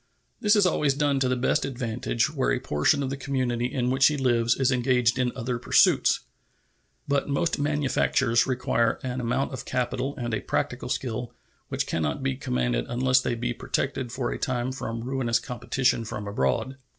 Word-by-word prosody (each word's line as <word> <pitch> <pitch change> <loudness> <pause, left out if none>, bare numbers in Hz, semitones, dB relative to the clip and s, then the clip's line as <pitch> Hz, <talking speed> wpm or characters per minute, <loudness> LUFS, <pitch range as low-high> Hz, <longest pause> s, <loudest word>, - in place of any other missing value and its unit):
This 210 +1 +4
is 205 -2 +4
always 150 -5 +2
done 145 -1 +1
to 130 -1 +1
the 130 - +2
best 125 - +1
advantage 120 +1 -1
where 135 -4 0
a 130 - +1
portion 130 - +1
of 135 - -3
the - - -2
community 130 -3 -1
in 125 -1 -1
which 135 +1 +5
he 150 - 0
lives 120 -3 +2
is 135 -1 +2
engaged 125 -1 +2
in 125 -1 +1
other 120 0 -3
pursuits. - - +4 0.9
But 140 0 0
most 140 +3 0
manufactures 140 -4 +1
require 120 -3 +1
an 130 -1 -3
amount 125 +4 -1
of 130 - -5
capital 125 +2 -2
and 120 -2 -3
a 110 - -1
practical - - -2
skill 120 -1 -3 0.3
which - - -2
can 80 - -2
not 75 -3 -2
be 65 - 0
commanded - - -1
unless 130 +1 +3
they 120 - -1
be 120 +1 -2
protected 130 0 -2
for 125 -1 -2
a - - -4
time 125 0 -1
from 115 -3 -5
ruinous 125 -2 0
competition 125 0 0
from 110 -2 -6
abroad. 100 - -1
125 Hz, 185 wpm, -26 LUFS, 120-135 Hz, 0.9 s, which